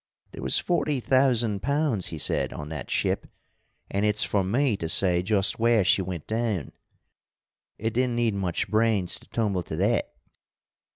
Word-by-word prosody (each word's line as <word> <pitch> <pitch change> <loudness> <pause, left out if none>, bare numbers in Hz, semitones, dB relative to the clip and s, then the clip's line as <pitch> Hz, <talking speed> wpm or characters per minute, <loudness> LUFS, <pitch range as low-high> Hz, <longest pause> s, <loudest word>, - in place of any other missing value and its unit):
'There - - -9
was - - +2
forty 155 -5 0
thousand 120 -6 +2
pounds,' 140 - 0
he 80 - -6
said, - - 0
'on 75 0 -7
that 75 -4 -6
ship, - - -1 0.6
and 100 +1 0
it's 105 0 +2
for 100 -2 +1
me 120 +5 +1
to 80 -4 -4
say 90 0 +3
just 100 +2 +1
where 115 -2 +3
she 95 - +3
went 90 -4 -5
down.' 110 - -2 1.1
It 110 +1 -2
didn't 125 0 0
need 120 -2 +1
much 95 -4 -2
brains 110 -4 +1
to - - -20
tumble 105 -5 -1
to - - -6
that. - - 0
105 Hz, 165 wpm, -26 LUFS, 95-120 Hz, 1.1 s, say